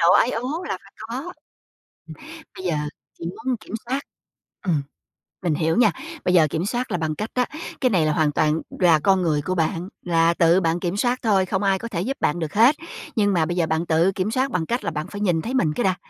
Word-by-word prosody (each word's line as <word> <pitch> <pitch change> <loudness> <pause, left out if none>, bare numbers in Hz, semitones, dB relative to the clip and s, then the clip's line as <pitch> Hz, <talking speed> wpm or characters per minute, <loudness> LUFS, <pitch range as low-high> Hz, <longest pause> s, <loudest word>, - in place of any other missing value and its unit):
nộ 170 +1 +5
ái 240 - +5
ố 270 +10 -3
là - - -2
phải - - -18
có. 240 +4 -5
Ừm, 355 +3 -12 1.1
bây 185 - -7
giờ 175 -3 +1 0.4
chỉ - - -7
muốn 230 +8 -2
kiểm 215 - -10
soát. 265 +2 0 0.7
Ừm, 160 -6 +2 0.6
mình 170 -4 +1
hiểu 160 +1 +1
nha, 235 -3 +5 0.3
bây 180 - +3
giờ 160 -3 +6
kiểm 165 +5 -2
soát 245 +2 -2
là 180 - +1
bằng 155 -2 -2
cách 215 +6 -4
đó, 250 -1 +3 0.4
cái 255 - +4
này 180 -8 +2
là 155 - +2
hoàn 155 -3 +2
toàn 155 +2 +1 0.2
là 170 -4 +5
con 190 +3 +3
người 155 -4 +1
của 185 +6 -2
bạn, 170 +2 -1
là 165 -1 +3
tự 170 +2 +4
bạn 165 0 +1
kiểm 175 +2 -2
soát 245 +3 +1
thôi, 200 -5 +3
không 190 +2 -1
ai 195 -1 +2
có 230 - -5
thể 175 -7 -3
giúp 270 +7 -2
bạn 150 - +1
được 160 -3 -4
hết, 235 +8 +6 0.4
nhưng 205 -2 +3
mà 165 -3 +2
bây 175 - -2
giờ 170 - +3
bạn 160 +2 0
tự 165 +3 +3
kiểm 195 +2 -2
soát 260 +2 0
bằng 165 -3 0
cách 240 +6 -2
là - - -1
bạn 155 -1 -4
phải 205 - -7
nhìn 175 -5 +2
thấy 240 - -4
mình 160 -13 +2
cái 240 - -1
đã. 185 -1 +2
180 Hz, 250 wpm, -23 LUFS, 165-225 Hz, 1.1 s, giờ